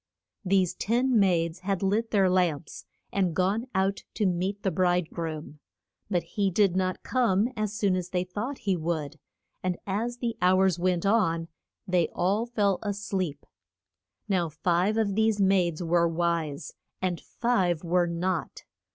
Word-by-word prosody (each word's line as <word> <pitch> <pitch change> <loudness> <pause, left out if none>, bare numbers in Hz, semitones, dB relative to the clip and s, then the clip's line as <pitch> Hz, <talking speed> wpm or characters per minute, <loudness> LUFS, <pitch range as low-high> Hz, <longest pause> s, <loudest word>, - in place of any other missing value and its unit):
These 190 -2 +2
ten 240 +2 +1
maids 170 -3 +2
had 195 0 -2
lit 215 +4 +1
their 195 -3 +3
lamps, 175 -5 0 0.3
and 185 -5 +1
gone 200 +6 +1
out 195 +1 +1
to 210 - +1
meet 185 +2 -1
the 190 - +1
bride 180 -1 +1
groom. 155 -2 -5 0.5
But 180 -4 +1
he 200 -2 -1
did 190 -1 +2
not 185 -1 -1
come 230 -4 +2
as 215 -2 -2
soon 200 -3 +2
as 180 -1 -3
they 180 -1 0
thought 210 +9 -4
he 195 -2 +2
would, 155 -3 -3 0.4
and 180 -1 -1
as 225 +5 -2
the 235 -1 -2
hours 185 -1 +3
went 180 0 +1
on 170 -6 +2 0.4
they 180 -3 +2
all 200 +6 +1
fell 205 -5 +1
a 205 -2 -2
sleep. 185 -7 -3 0.8
Now 180 -5 +1
five 175 +7 +1
of 210 -3 +1
these 220 0 +2
maids 185 -4 +2
were 170 0 +3
wise, 165 -3 -2 0.3
and 180 -2 -2
five 185 -9 0
were 175 +1 +2
not. 175 +1 -2
185 Hz, 155 wpm, -27 LUFS, 175-205 Hz, 0.8 s, their